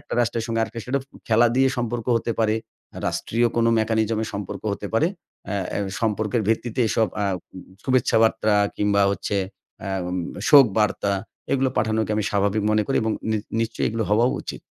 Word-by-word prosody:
একটা - - -13
রাষ্ট্রের 115 -1 0
সঙ্গে 115 -1 -1
আরেকটা 115 +1 -4
সেডফ 130 +1 -1 0.3
খেলা 115 +2 +5
দিয়ে 135 0 +4
সম্পর্ক 120 -1 -2
হতে 115 0 -1
পারে। 110 -1 +2 0.5
রাষ্ট্রীয় 120 +1 0
কোনো 115 0 +3
মেকানিজমে 110 0 +1
সম্পর্ক 100 -2 -5
হতে 100 - -5
পারে। 150 +9 +4 0.5
এ - - -1 0.2
এ - - -1 0.2
সম্পর্কের 110 0 0
ভিত্তিতে 115 +2 0
এসব 110 +1 +2
অ্যা 105 - 0
উ - - -19 0.4
শুভেচ্ছা 130 -2 +2
বার্তা 110 -1 +2 0.2
কিংবা 100 -1 +2
হচ্ছে 100 +1 -2 0.4
অ্যা 95 - -5
এম 90 0 -3 0.3
শোক 140 -3 +9
বার্তা 105 -1 +1 0.4
এগুলো 135 -1 +2
পাঠানোকে 110 -1 0
আমি 105 - 0
স্বাভাবিক 100 +1 +1
মনে 110 0 +3
করি 135 - 0
এবং 110 -1 0 0.2
নি 110 - +2 0.2
নিশ্চয়ই 115 0 -1
এগুলো 115 0 -2
হওয়াও 115 +4 +4
উচিত। - - -7
110 Hz, 175 wpm, -23 LUFS, 105-120 Hz, 0.5 s, শোক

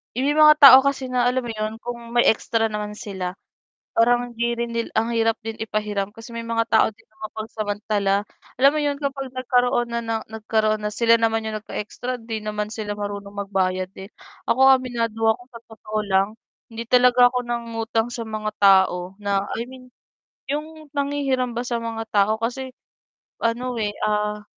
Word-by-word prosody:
may 275 +3 +1
mga 305 0 +8
tao 265 -1 +12
kasi 270 -2 -1
na 245 -1 +2
alam 255 0 0
mo 235 - -4
yun 215 0 -3
kung 240 0 -5 0.2
may 240 - +5
extra 225 0 +1
naman 210 0 -4
sila, 190 -3 -5 0.6
parang 240 +1 +3
hindi 235 +1 0
rin 235 0 -3
nil 230 - -1
ang 225 +2 0
hirap 225 0 +2
din 225 0 -6
ipahiram 210 -2 -2
kasi 225 +2 -12
may 230 - -4
mga 230 0 0
tao 220 - +4
din 225 +2 -26
na - - -31
mapagsamantala 210 -2 -2 0.4
alam 275 +2 +6
mo 305 - -1
'yon, 290 -1 0
kapag 275 -2 -4
nagkaroon 245 -1 +1
na 235 - -1
ng 225 -1 -3
nagkaroon 215 0 0
na 210 - -2
sila 230 +2 +3
naman 225 0 +1
yung 215 -1 -4
nag-extra 245 +4 -5
hindi 225 -2 -6
naman 210 0 -4
sila 215 -2 -4
marunong 205 -1 -5
magbayad 185 -1 -1
din. 190 0 -10 0.4
Ako 255 - +2 0.2
aminado 230 -3 -3
ako 235 +2 +1
sa 230 - -9
totoo 215 -1 -5
lang, 190 0 +3 0.4
hindi 230 +1 -5
talaga 250 0 +6
ako 250 - 0
nangutang 230 -1 -2
sa 240 -1 -5
mga 215 -1 -4
tao 190 -1 +4
na, 200 -1 0
I 230 - -3
mean 255 -1 -13 0.6
yung 310 0 -5
nanghihiram 280 -4 -1
ba 240 - -2
sa 240 -1 -2
mga 225 -1 -5
tao. 205 +1 +3
Kasi, 250 +3 -4 0.7
ano, 240 +1 -1
eh, 210 -2 -2
ah, 210 0 -1
225 Hz, 180 wpm, -23 LUFS, 210-245 Hz, 0.7 s, tao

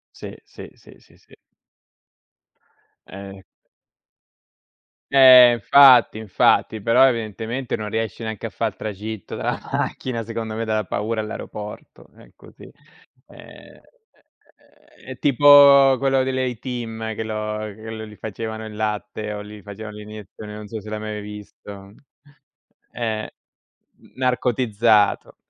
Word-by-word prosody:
Sì, - - -9
sì, - - -12
sì, - - -19
sì. - - -23 1.7
Eh. 95 0 -11 1.7
Eh 130 -2 +9
infatti, 125 +1 +6
infatti, 110 +1 +1
però 115 +5 +4
evidentemente 115 +1 -3
non 105 -1 -6
riesci 110 0 -4
neanche 110 0 -5
a - - -7
fà 115 - -4
il 110 -3 -2
tragitto 105 -1 -7
dalla - - -3
macchina, 115 -3 -3
secondo 115 -1 -5
me, 115 +1 -3
dalla 110 -1 -1
paura, 110 +3 -3
all'aeroporto, 105 -1 -9
è - - -19
così. - - -18 0.6
Ehm, - - -16 1.1
è - - -23
è - - -8
tipo 140 -1 +6
quello 135 0 +1
dell'A-Team 120 -3 -4
che 110 - -5
lo 110 -1 -4 0.2
che 110 0 -10
lo 110 0 -7
gli 105 0 -13
facevano 110 +1 -6
il 110 -1 -9
latte 105 0 -4
o 105 - -6
gli 105 0 -11
facevano 105 +1 -10
l'iniezione, 105 0 -11
non 105 0 -9
so 110 +1 -7
se 105 - -13
l'hai 110 0 -4
mai 105 0 -5
visto. 105 -1 -11 1.0
Eh, 110 -2 -4 0.9
narcotizzato. 120 -4 +1
110 Hz, 120 wpm, -21 LUFS, 105-120 Hz, 1.7 s, Eh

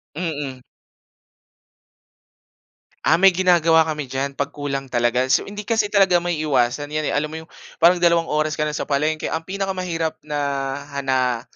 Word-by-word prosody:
Mm. 145 -6 -4 2.4
Ah, 165 - +4
may 190 +1 +6
ginagawa 170 -3 +4
kami 155 -2 -2
diyan 135 +2 -4
'pag 140 0 -2
kulang 140 -2 -4
talaga. 120 0 +1
So 130 - +3
hindi 205 0 -7
kasi 220 -1 +1
talaga 190 -4 +4
maiiwasan 150 -4 0
'yan 155 0 -1
eh. - - -2
Alam 150 +1 -1
mo - - -5
'yung 160 - -17 0.3
parang 175 +2 +6
dalawang 170 -1 +2
oras 155 0 0
ka 150 - -3
na 150 0 -1
sa - - -3
palengke 155 +2 -1
ang 160 - -2
pinakamahirap 185 -3 -3
na 150 -1 -5 0.6
hana 130 -3 0
155 Hz, 155 wpm, -21 LUFS, 140-175 Hz, 2.4 s, may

